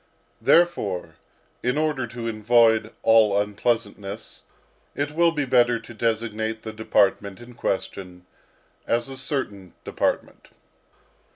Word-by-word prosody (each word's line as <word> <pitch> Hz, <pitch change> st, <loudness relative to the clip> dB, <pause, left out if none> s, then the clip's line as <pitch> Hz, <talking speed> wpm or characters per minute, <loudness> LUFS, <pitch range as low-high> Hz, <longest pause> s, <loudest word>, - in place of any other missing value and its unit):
Therefore, 100 Hz, -, +2 dB, 0.4 s
in 125 Hz, +3 st, 0 dB
order 150 Hz, -5 st, 0 dB
to 115 Hz, 0 st, -6 dB
avoid 110 Hz, 0 st, +3 dB
all 110 Hz, -3 st, +5 dB
unpleasantness, 105 Hz, -1 st, -3 dB, 0.5 s
it 145 Hz, +1 st, -2 dB
will 170 Hz, +2 st, +3 dB
be 150 Hz, -3 st, -1 dB
better 120 Hz, -2 st, +3 dB
to 120 Hz, -, -12 dB
designate 110 Hz, -1 st, -2 dB
the 110 Hz, -, -6 dB
department 100 Hz, -2 st, +1 dB
in 120 Hz, +1 st, -12 dB
question, 90 Hz, -5 st, -4 dB, 0.6 s
as 120 Hz, +2 st, 0 dB
a 135 Hz, -, -6 dB
certain 110 Hz, -, -4 dB
department. -, -, -2 dB
115 Hz, 110 wpm, -24 LUFS, 105-125 Hz, 0.6 s, all